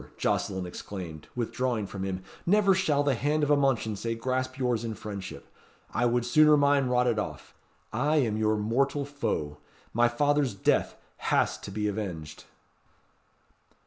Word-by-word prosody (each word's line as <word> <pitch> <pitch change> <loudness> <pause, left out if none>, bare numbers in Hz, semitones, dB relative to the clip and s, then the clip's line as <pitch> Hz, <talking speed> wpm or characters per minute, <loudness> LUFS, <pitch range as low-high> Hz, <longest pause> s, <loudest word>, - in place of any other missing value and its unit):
Jocelyn 95 -2 -1
exclaimed, 90 -3 -7
withdrawing 120 -2 -1
from 100 0 -7
him, 95 -1 -3 0.2
"never 200 +1 +4
shall 155 -6 +2
the 145 -1 +2
hand 150 +5 0
of 145 - +2
a - - +7
Mounchensey 115 -5 0
grasp 130 +2 -2
yours 125 -4 0
in 115 -2 -3
friendship! 100 -3 -7 0.5
I 120 +2 +2
would 120 0 +1
sooner 150 +4 +6
mine 140 -2 +3
rotted 125 -2 +2
off! - - -6 0.4
I 150 +2 +1
am 120 -8 +2
your 110 0 +1
mortal 135 +7 0
foe. 75 - -3 0.3
My 120 +1 +4
father's 145 0 +1
death 95 - +1 0.2
has - - +1
to - - -8
be 105 +1 -2
avenged." 90 -8 -5
120 Hz, 145 wpm, -28 LUFS, 105-140 Hz, 0.5 s, a